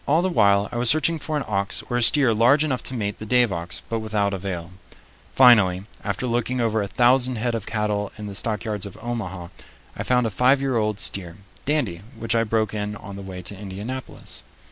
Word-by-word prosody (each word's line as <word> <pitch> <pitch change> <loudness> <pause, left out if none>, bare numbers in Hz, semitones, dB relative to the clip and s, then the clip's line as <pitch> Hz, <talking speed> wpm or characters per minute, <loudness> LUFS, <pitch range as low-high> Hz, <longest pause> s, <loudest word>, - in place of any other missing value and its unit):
All 155 +5 +3
the 185 - +1
while 100 - +3
I 120 - -4
was 120 0 +3
searching 155 +3 +3
for 155 +1 -3
an 145 - -2
ox 100 -1 -1
or 120 - -3
a 120 - +1
steer 125 0 +5
large 125 +7 +4
enough 135 -5 -1
to 130 - -2
mate 105 -3 -3
the 110 - -6
Dave 120 -3 +3
ox, 85 +1 -5
but 115 - -2
without 105 -2 -1
avail. 90 -2 -5 0.6
Finally, 105 -8 +6 0.2
after 100 +4 -2
looking 120 +1 -1
over 110 -2 +1
a 100 - -2
thousand 125 +4 +3
head 120 +2 -1
of 115 -3 -4
cattle 105 -2 -1
in 105 - -7
the 100 - -6
stockyards 105 -1 -2
of 100 - -12
Omaha, 95 -7 -5 0.5
I - - -5
found 125 -1 +2
a 110 - -1
five 125 +7 +3
year 135 -2 -1
old 105 -2 0
steer, 90 -5 +1 0.3
Dandy, 125 - -1 0.2
which 115 +1 -1
I 115 0 +3
broke 110 -1 0
in 105 0 -3
on 100 -1 -9
the 100 - -7
way 95 -2 -8
to 100 - -6
Indianapolis. 105 - -5
110 Hz, 215 wpm, -23 LUFS, 100-125 Hz, 0.6 s, Finally